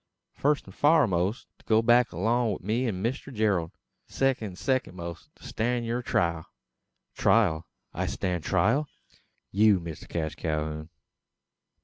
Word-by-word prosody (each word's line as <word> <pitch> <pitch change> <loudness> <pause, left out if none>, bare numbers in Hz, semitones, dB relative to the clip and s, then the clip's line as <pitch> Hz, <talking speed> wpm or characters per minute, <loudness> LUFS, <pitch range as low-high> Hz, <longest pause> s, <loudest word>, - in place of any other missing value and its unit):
"Fust 145 +1 +1
an - - -12
foremost, 115 - +2
to - - -24
go 110 0 +3
back 120 +1 +4
along 110 +5 +1
wi' - - -4
me 115 +6 0
an 95 -4 -3
Mister 130 +4 -2
Gerald. 105 -9 +1 0.4
Second 135 -5 0
an 95 - -9
second 130 -3 -1
most, 85 -1 -7
to - - -21
stan' 120 +2 -1
yur 120 +2 -2
trial." 85 -8 0 0.7
"Trial! 90 -8 +2 0.3
I 90 +2 -2
stand 90 -3 -2
trial!" 115 - +2 0.6
"You, 105 -1 +4
Mister 85 -2 -8
Cash 80 -2 -3
Calhoun." 75 0 -3
105 Hz, 140 wpm, -27 LUFS, 85-120 Hz, 0.7 s, back